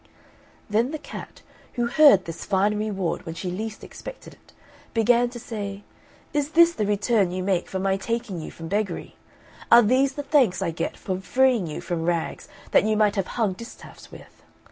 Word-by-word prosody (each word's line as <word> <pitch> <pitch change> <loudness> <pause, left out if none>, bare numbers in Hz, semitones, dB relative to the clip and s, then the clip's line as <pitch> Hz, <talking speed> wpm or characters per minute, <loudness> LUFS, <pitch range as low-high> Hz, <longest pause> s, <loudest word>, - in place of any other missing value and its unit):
Then 225 +4 +1
the 310 - -4
cat, 290 - -10 0.3
who 240 - 0
heard 240 - +6
this 165 0 -7
fine 200 +2 +1
reward 205 -4 -2
when 165 - -7
she 180 +1 -4
least 215 +4 -5
expected - - -10
it, - - -23 0.4
began 240 +2 +3
to 240 0 -9
say, 205 -4 -6 0.5
"Is 295 +1 -1
this 340 +1 +6
the 210 -9 -1
return 205 -1 +2
you 185 +1 -3
make 185 -2 0
for 190 - -3
my 190 0 +1
taking 205 -4 -3
you - - -7
from 165 - -9
beggary? 200 -1 -3 0.6
Are 235 +1 +9
these 260 +5 +3
the 290 - -5
thanks 265 - +3
I - - -1
get 165 - -4
for 185 -1 -3
freeing 240 +1 +2
you 150 - -5
from 175 -2 -3
rags 170 -1 -2 0.2
that - - +5
you 215 0 +1
might 210 -1 +3
have 195 -2 -1
hung 215 -5 +1
distaffs 230 +5 -12
with? - - -14
210 Hz, 190 wpm, -24 LUFS, 185-240 Hz, 0.6 s, Are